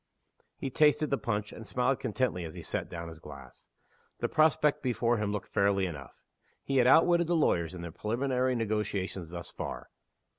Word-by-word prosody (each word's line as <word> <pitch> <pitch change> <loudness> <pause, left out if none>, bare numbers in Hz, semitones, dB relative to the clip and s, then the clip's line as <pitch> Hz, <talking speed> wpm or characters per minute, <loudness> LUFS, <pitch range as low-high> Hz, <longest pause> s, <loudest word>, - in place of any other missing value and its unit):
He 135 - -4
tasted 150 +1 +3
the 140 - +1
punch, 105 -4 -2
and 115 - -10
smiled 125 +5 +1
contentedly 120 -6 -1
as 80 -1 -7
he - - -8
set - - -3
down 85 0 -6
his 80 -1 -10
glass. 70 -4 -12 0.5
The - - -1
prospect 155 -2 +3
before 120 -2 +1
him 105 -1 -1
looked 105 -2 -5
fairly 100 -1 +2
enough. 75 -6 -8 0.4
He 135 - -1
had 125 -1 +5
outwitted 170 +4 +5
the 175 - +2
lawyers 85 - +1
in 85 - -7
the 85 - -6
preliminary 125 - 0
negotiations 105 -6 -2
thus 85 0 -7
far. - - -6
110 Hz, 180 wpm, -30 LUFS, 90-130 Hz, 0.5 s, had